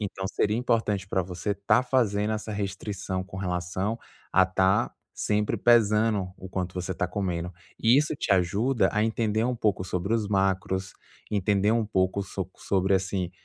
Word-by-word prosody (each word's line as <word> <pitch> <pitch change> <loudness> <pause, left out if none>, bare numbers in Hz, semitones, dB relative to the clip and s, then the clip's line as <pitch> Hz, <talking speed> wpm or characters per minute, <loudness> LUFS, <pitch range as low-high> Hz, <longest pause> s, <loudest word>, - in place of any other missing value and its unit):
Então, 95 -2 -4
seria 105 +1 0
importante 110 -5 0
para 95 - +1
você 90 +3 -3
tá 100 +5 +2
fazendo 110 -5 +1
essa 110 0 -4
restrição, 95 -1 -3
com 95 - -10
relação 95 +3 -2 0.3
a 95 - +6
estar 95 +1 +2 0.2
sempre 105 +1 0
pesando 110 -3 +3
o 95 - -9
quanto 90 -1 -3
você 90 0 -4
está 90 +1 -1
comendo. 90 -2 -3 0.3
E 115 +3 +5
isso 150 +1 +1
te 105 - 0
ajuda 100 +7 +2
a 105 +1 +2
entender 110 -1 0
um 125 +1 0
pouco 105 -4 0
sobre 95 +2 -2
os 110 -2 0
macros, 95 -1 0 0.4
entender 100 0 +2
um 115 -1 +1
pouco 95 0 +1 0.4
sobre 95 0 +1
assim, 95 -2 -1
100 Hz, 160 wpm, -27 LUFS, 95-110 Hz, 0.4 s, a